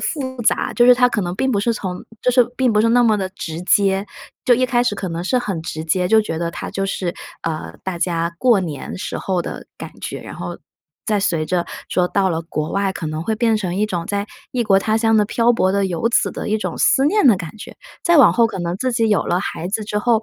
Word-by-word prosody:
复 260 -5 -3
杂。 - - +1
就 240 - +4
是 250 - +8
它 250 0 +4
可 210 - -1
能 175 -1 -3
并 265 +5 0
不 205 -5 +1
是 235 +3 +1
从 185 -4 -5 0.2
就 250 - +3
是 250 -1 +5
并 255 -3 +2
不 210 - +3
是 230 - +3
那 245 +1 +5
么 220 -2 +4
地 190 -2 -2
直 165 -3 -6
接， 195 +1 +2 0.4
就 245 - +5
一 255 +2 +2
开 245 -1 +2
始 240 -4 0
可 190 -2 -4
能 165 +1 -4
是 250 +8 +1
很 195 -9 -3
直 160 -1 -5
接， 180 +2 0
就 220 +1 +5
觉 165 -6 -4
得 170 0 -2
它 - - -6
就 195 - -2
是， 180 -2 -3 0.3
呃， 160 -1 -4
大 185 -2 -4
家 170 -1 -1
过 235 -4 +4
年 150 -6 -5
时 185 - -4
候 185 -3 -1
的 - - -7
感 - - -8
觉， - - -5
然 - - -9
后 - - -6 0.5
再 210 -3 +1
随 165 -5 0
着 175 +1 -1 0.2
说 180 -1 +1
到 195 -2 +1
了 165 0 -1
国 155 -1 -4
外 195 -1 0
可 165 - -5
能 155 +1 -3
会 220 +4 -1
变 225 -1 +2
成 180 -4 -3
一 210 - +2
种， 175 -5 -3
在 200 0 -2 0.3
异 245 -2 0
国 195 -2 +4
他 215 +2 0
乡 225 -1 +3
的 210 - +4
漂 235 +3 +2
泊 190 -5 +2
的 200 0 +1
游 185 +6 -1
子 - - +2
的 - - -5
一 215 - +2
种 215 - -4
思 270 - +3
念 415 -2 +3
的 220 -6 +6
感 180 +3 -8
觉， 225 - -10 0.3
再 345 -1 +4
往 280 - +7
后 235 -1 +4
可 210 - -6
能 175 +1 -2
自 255 +4 -1
己 225 -1 +1
有 210 - +3
了 175 - +1
孩 180 -2 -4
子 210 +2 -2
之 210 0 -2
后， 225 0 +2
200 Hz, 285 characters per minute, -20 LUFS, 180-230 Hz, 0.5 s, 是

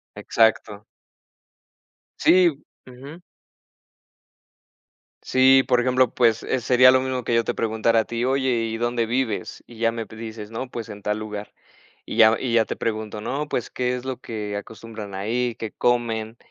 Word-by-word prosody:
Exacto. 110 -2 +1 1.3
Sí, 180 -1 +5 0.4
Ujú. 140 +7 -11 2.0
Sí, 130 +1 +5
por 125 -1 +3
ejemplo, 130 -1 +2
pues, 115 -3 +2
eh, 130 - -1
sería 125 +1 +6
lo 130 0 +3
mismo 130 -1 -3
que 120 - -2
yo 115 - +3
te 120 - -2
preguntara 115 0 +1
a - - -7
ti: 120 +1 -3
"Oye, 130 0 +1 0.2
¿y 115 0 -3
dónde 120 0 0
vives? 120 -2 -3
"Y 120 - -14
ya 115 0 +2
me 115 -1 -5
p 110 - -14
dices: 110 -1 -8
"No, 125 +3 -5
pues 115 -2 -7
en 105 -1 -9
tal 105 +1 -1
lugar". 105 -1 -7 0.5
Y - - -6
ya 110 -1 +6
y 125 -3 -2
ya 115 -1 +4
te - - -4
pregunto: 110 -1 -4
"No, 140 +7 -3
pues, 125 - -2
¿qué 125 0 -1
es 125 - -7
lo 130 -1 -4
que 105 -2 -5
acostumbran 110 -1 -8
ahí? 115 +4 -1
¿Qué 110 -2 -5
comen? 115 -2 -1
115 Hz, 170 wpm, -23 LUFS, 110-125 Hz, 2.0 s, sería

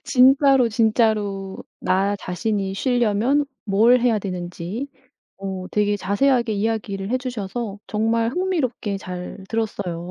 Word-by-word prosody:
진짜로, 270 0 +5
진짜로 215 -4 +1 0.2
나 195 +2 +1
자신이 195 +1 -2
쉬려면 245 +4 +2 0.2
뭘 225 +4 +4
해야 235 -3 +3
되는지 180 +5 -5 0.5
어 190 -1 -5
되게 205 0 +1
자세하게 235 +5 +1
이야기를 205 -1 -2
해주셔서 240 -4 -3
정말 225 +2 +1
흥미롭게 265 - -1
잘 180 +1 -7
들었어요. 185 -6 -3
215 Hz, 265 characters per minute, -22 LUFS, 195-245 Hz, 0.5 s, 진짜로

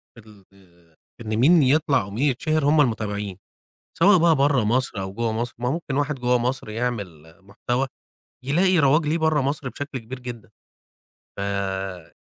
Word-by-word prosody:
في 110 -2 -16 0.3
ال 85 -3 -25 0.3
إن 110 -1 -3
مين 155 +6 +5
يطلع 140 -3 +2
ومين 105 +7 -4
يتشهر 155 +3 -1
هم 150 +1 +4
المتابعين 105 -5 -2 0.6
سواء 190 +3 +6
بقى 165 -1 +4
برّه 140 -3 +2
مصر 115 -2 0
أو 95 0 -6
جوّه 115 +1 -1
مصر 120 +2 -3
ما 125 +1 -2
ممكن 145 -2 -3
واحد 145 +1 0
جوّه 125 -1 +1
مصر 125 -1 -3
يعمل 100 -9 -5
محتوى 120 +7 -3 0.6
يلاقي 175 +6 +2
رواج 150 +2 +3
ليه 155 +2 +1
برّه 160 -2 +2
مصر 140 0 -2
بشكل 140 0 -6
كبير 125 +3 -9
جدًا. 120 -4 -9 0.9
فيع 95 -3 -4
125 Hz, 155 wpm, -23 LUFS, 105-145 Hz, 0.9 s, سواء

